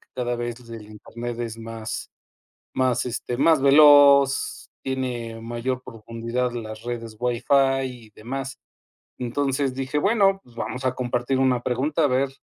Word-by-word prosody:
que - - -29
cada 120 -1 -2
vez 120 0 -4
el 115 -2 -9
internet 115 +3 -7
es 115 -2 -4
más 115 -1 -6 0.6
más, 130 -2 +1
este, 120 0 -4
más 155 +2 +4
veloz, 145 - +6
tiene 120 -4 -4
mayor 120 +2 -3
profundidad 115 +2 -4
las 110 -1 -7
redes 115 -2 -5
WiFi 135 +2 +2
y 125 -4 -8
demás. 135 +4 -6 0.6
Entonces 135 +2 -1
dije, 135 +2 -2
bueno, 195 +1 +3
pues 120 - -21
vamos 125 +2 -4
a 130 0 +1
compartir 125 +1 -1
una 130 -2 +2
pregunta 140 +6 0
a - - +6
ver 135 0 +1
125 Hz, 145 wpm, -24 LUFS, 115-135 Hz, 0.6 s, veloz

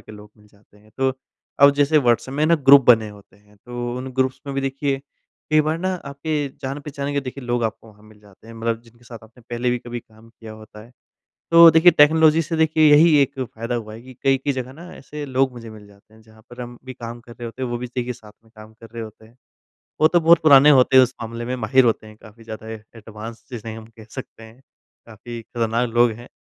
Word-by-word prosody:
के - - -14
लोग 105 0 -14
मिल 105 0 -23
जाते 105 0 -27
हैं। 105 +1 -24
तो 135 0 +1 0.5
अब 140 - +9
जैसे 145 +2 +3
व्हॉट्सऐप 125 0 0
में 150 +1 0
ना 170 - +4
ग्रुप 140 -3 +6
बने 110 -3 +5
होते 100 -1 -16
हैं, 105 0 -26
तो 120 +2 -6
उन 130 +1 -6
ग्रुप्स 130 0 -1
में 140 - -5
भी, 135 - -1
देखिए, 135 0 -2 0.5
कई 155 0 +5
बार 155 +2 -1
ना 185 +1 -2
आपके 145 +1 -3
जान-पहचान 140 +1 -5
के, 140 - 0
देखिए, 130 0 -8
लोग 120 -1 -1
आपको 110 0 -5
वहाँ 105 0 -20
मिल 110 -1 -19
जाते 105 +1 -21
हैं 115 - -12
मतलब 115 0 -3
जिनके 120 +1 -23
साथ 115 -1 -11
आपने 110 +2 -19
पहले 120 +1 -1
भी 125 - -1
कभी 120 0 -7
काम 110 0 -21
किया 110 -1 -12
होता 110 0 -14
है। 120 - -20 0.6
तो 165 0 +9
देखिए, 165 +3 +6
टेक्नोलॉजी 160 +1 +4
से 165 +1 -4
देखिए 155 -1 +3
यही 155 +1 +6
एक 135 0 -4
फ़ायदा 115 0 -5
हुआ 110 -2 -5
है 110 - -11
कि 130 0 -14
कई-कई 135 +1 +1
जगह 130 0 -6
ना 170 +5 -12
ऐसे 145 +2 -9
लोग 130 0 0
मुझे 115 -2 -10
मिल 105 -1 -13
जाते 100 +2 -23
हैं, 110 - -19
जहाँ 110 0 -21
पर 120 +1 -11
हम 120 0 -10
भी 130 - -8
काम 120 0 -9
कर 120 - -15
रहे 120 - -10
होते 125 +3 -8
हैं, 125 - -2
वो 120 - -3
भी 125 - -5
देखिए 125 0 -4
साथ 110 -3 -16
में 115 - -25
काम 110 0 -14
कर 115 - -13
रहे 115 -1 -7
होते 110 0 -12
हैं। 115 +3 -21 0.6
वो 155 - +6
तो 175 0 +2
बहुत 165 +1 +5
पुराने 145 -1 +7
होते 130 +1 +3
हैं 130 - +9
उस 125 +1 0
मामले 115 +1 -6
में, 125 +2 -3
माहिर 125 +3 +2
होते 110 -1 0
हैं, 110 - -14
काफ़ी 110 +2 -16
ज़्यादा 110 0 -9 0.3
एडवांस 110 +1 -10
जिसे 115 -1 -7
हम 110 0 -11
कह 110 - -13
सकते 130 -3 -10
हैं, 110 +3 -15 0.5
काफ़ी 115 +1 -10
खतरनाक 115 +1 -2
लोग 120 +1 +3
हैं। 120 +2 -11
120 Hz, 245 wpm, -21 LUFS, 110-140 Hz, 0.6 s, अब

